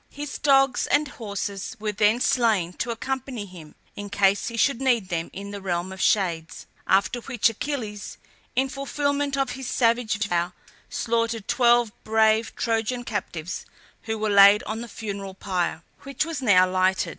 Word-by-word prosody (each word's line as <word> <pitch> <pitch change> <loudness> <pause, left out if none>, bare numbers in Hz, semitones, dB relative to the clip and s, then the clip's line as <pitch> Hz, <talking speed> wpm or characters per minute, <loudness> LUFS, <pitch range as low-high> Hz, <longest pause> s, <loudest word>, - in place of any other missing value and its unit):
His 290 0 -6
dogs 270 -2 +3
and 300 +1 +2
horses 205 -2 -5
were 210 0 -2
then 210 +3 +2
slain 215 -10 +2
to 240 - -2
accompany 255 -1 -4
him, 170 -5 -13 0.2
in 205 0 -7
case 200 0 +2
he 235 0 -5
should 260 +1 +2
need 240 -8 +1
them 165 -2 -2
in 200 +1 -8
the 200 0 -7
realm 180 -1 -2
of 190 - -7
shades; 170 -5 0 0.2
after 195 +5 +2
which 240 -3 +1
Achilles, 225 -4 -5 0.4
in 265 +1 +2
fulfilment 280 +1 -1
of 270 -2 0
his 265 0 -6
savage 230 -3 +1
vow, 175 -1 -1 0.4
slaughtered 230 -2 -1
twelve 240 -2 +3
brave 220 +1 +2
Trojan 230 +2 -1
captives, 185 -6 -4 0.5
who 220 - -1
were 215 -1 -1
laid 200 +1 +7
on 220 +2 -4
the 235 - -6
funeral 200 -3 -6
pyre, 180 -4 -2 0.2
which 275 +2 -2
was 325 -3 -4
now 185 -7 +5
lighted. 185 -1 +1
220 Hz, 160 wpm, -24 LUFS, 195-250 Hz, 0.5 s, laid